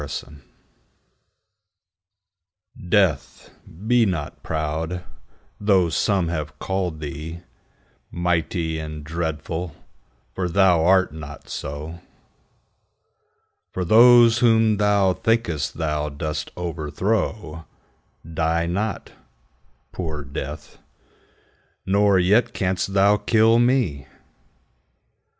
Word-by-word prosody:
Death 70 -1 -5 2.6
DEATH, 75 -10 +1 0.3
be 120 +1 +4
not 90 -8 -3
proud, 80 +3 -3 0.6
though 95 -4 +3
some 95 +1 +1
have 75 -2 -4
callèd 95 -3 -2
thee 80 +3 -7 0.7
Mighty 85 -1 -1
and 75 -1 -7
dreadful, 80 +1 -4 0.6
for 90 -1 -2
thou 90 -3 +4
art 95 -1 +3
not 75 -2 -10
so: 75 +4 -6 1.7
For 90 - -2
those 115 +3 +7
whom 115 -2 +4
thou 100 -2 +3
think'st 115 -9 -1
thou 75 -2 -2
dost 75 +1 -4
overthrow 85 +1 -3 0.6
Die 80 +1 0
not, 100 +4 -3 0.8
poor 80 -5 -5
Death; 70 +2 -7 1.1
nor 100 0 +3
yet 105 +6 +2
canst 95 0 -1
thou 100 +1 +5
kill 115 +1 +3
me. 120 - +1
85 Hz, 85 wpm, -22 LUFS, 80-100 Hz, 2.6 s, those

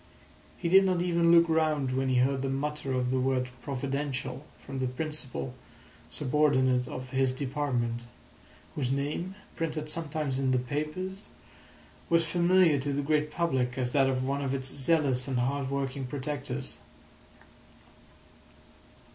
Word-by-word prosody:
He 175 - -3
did 190 +3 +7
not 185 -2 +1
even 170 -1 +3
look 170 0 +7
round 155 -5 +1
when 130 0 0
he 130 - +2
heard 130 +2 +2
the 135 - -1
mutter 140 +1 -2
of 125 -1 0
the 130 - +1
word 130 -1 0
"Providential" 135 -1 -3 0.2
from 135 -1 -5
the 130 - 0
principal 130 - -4 0.6
subordinate 130 -3 +2
of 130 0 -7
his 135 -1 +2
department, 130 -3 -2 0.7
whose 130 -3 -1
name, 150 +7 -2 0.2
printed 155 -2 -1
sometimes 155 -4 -2
in 135 -1 +1
the 130 - +3
papers, 155 +9 -3 0.9
was 165 0 +4
familiar 175 -1 +4
to 140 +2 -2
the 140 +1 -1
great 150 +1 +1
public 130 -7 0
as 125 -1 -1
that 135 -1 +3
of 130 -1 0
one 140 +2 -1
of 135 -1 -1
its 130 -1 0
zealous 140 -3 +3
and 130 -2 -1
hard 135 +2 0
working 135 -1 -2
protectors. 135 -1 -5
140 Hz, 145 wpm, -29 LUFS, 130-155 Hz, 0.9 s, did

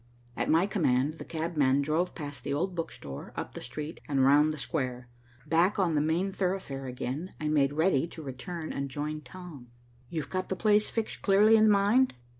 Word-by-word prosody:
At - - -2
my 165 +4 +4
command, 155 -6 +1
the - - -5
cabman 150 -5 +1
drove 160 +5 0
past 145 -3 -7
the 140 - -2
old 180 +5 -1
book 165 -2 -3
store, 70 -1 -9
up - - -5
the - - -7
street, 150 +6 -6
and 135 -2 +2
round 145 +3 +5
the 155 - -5
square. 125 -4 -3 0.4
Back 170 +5 +2
on 180 -5 +2
the 150 - +2
main 170 +6 0
thoroughfare 180 -9 -2
again, 130 +7 -5
I 155 - -2
made 140 -2 +3
ready 160 -1 +2
to 160 -1 -10
return 155 +5 -6
and 140 0 -3
join 150 +2 -4
Tom. 150 -2 -11 0.4
"You've 155 -4 -4
got 185 0 -2
the 190 - -1
place 210 +1 +3
fixed 225 -1 -3
clearly 210 +3 +5
in 220 0 +6
mind?" 210 - +4
155 Hz, 195 wpm, -29 LUFS, 140-185 Hz, 0.4 s, in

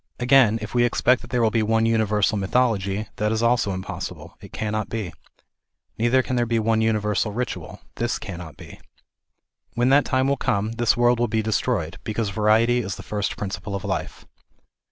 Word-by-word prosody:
Again, 125 -3 +5
if 110 - -7
we 120 -1 +3
expect 125 +1 +2
that 120 - -12
there 120 -1 +1
will 110 - +3
be 115 - +1
one 110 +1 +2
universal 110 -2 +2
mythology, 100 -1 0
that 105 +1 0
is 110 +1 0
also 115 -3 +2
impossible, 95 0 -6
it - - -12
cannot 110 0 -3
be. 105 -8 -4 0.8
Neither 120 +3 +2
can 130 - -3
there 120 -1 +1
be 115 0 +1
one 110 0 +1
universal 105 -1 0
ritual. 125 +4 -5 0.2
This 120 0 -1
cannot 85 -5 -8
be. - - -12 1.0
When 120 +2 +2
that 140 +1 +5
time 130 +1 +1
will 140 0 +1
come, 105 -2 -1
this 120 0 +1
world 120 0 +3
will 120 - +2
be 110 0 -1
destroyed, 105 -5 -1
because 110 -1 -2
variety 110 +4 +3
is 100 -5 -3
the - - -10
first 105 -1 -3
principle 100 0 -5
of 95 - -5
life. 95 -1 -4
110 Hz, 185 wpm, -23 LUFS, 105-120 Hz, 1.0 s, Again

